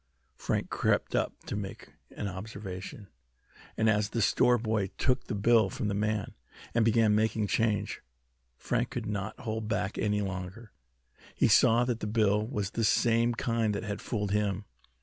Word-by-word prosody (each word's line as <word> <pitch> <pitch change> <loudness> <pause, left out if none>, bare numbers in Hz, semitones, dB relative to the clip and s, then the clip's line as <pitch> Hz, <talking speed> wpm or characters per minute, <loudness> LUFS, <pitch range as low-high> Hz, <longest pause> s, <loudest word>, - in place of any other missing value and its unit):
Frank - - -2
crept - - +1
up - - +1
to - - -4
make 100 -1 -6 0.3
an 105 - -3
observation, 95 +1 -7 0.7
and 110 - +2
as 105 -1 +2
the 115 - -1
store 120 +5 +4
boy 110 -3 0
took 125 0 +1
the 115 - -3
bill 110 0 +4
from 105 +2 -3
the - - -1
man, 105 0 -1 0.4
and 115 - +3
began 110 -1 +4
making 110 0 +1
change, 105 0 0 0.6
Frank - - -1
could - - -4
not 105 0 -4
hold 110 -2 -3
back 105 -2 -2
any 105 -1 +1
longer. 95 +3 -6 0.6
He - - +3
saw 120 +2 +5
that 120 -2 -1
the 105 - -3
bill 105 -1 +2
was 105 -6 -3
the 115 - -1
same 115 +2 +3
kind 115 -3 0
that 100 - -3
had 105 -1 -4
fooled 105 -4 -2
him. 105 -1 0
105 Hz, 170 wpm, -29 LUFS, 100-115 Hz, 0.7 s, saw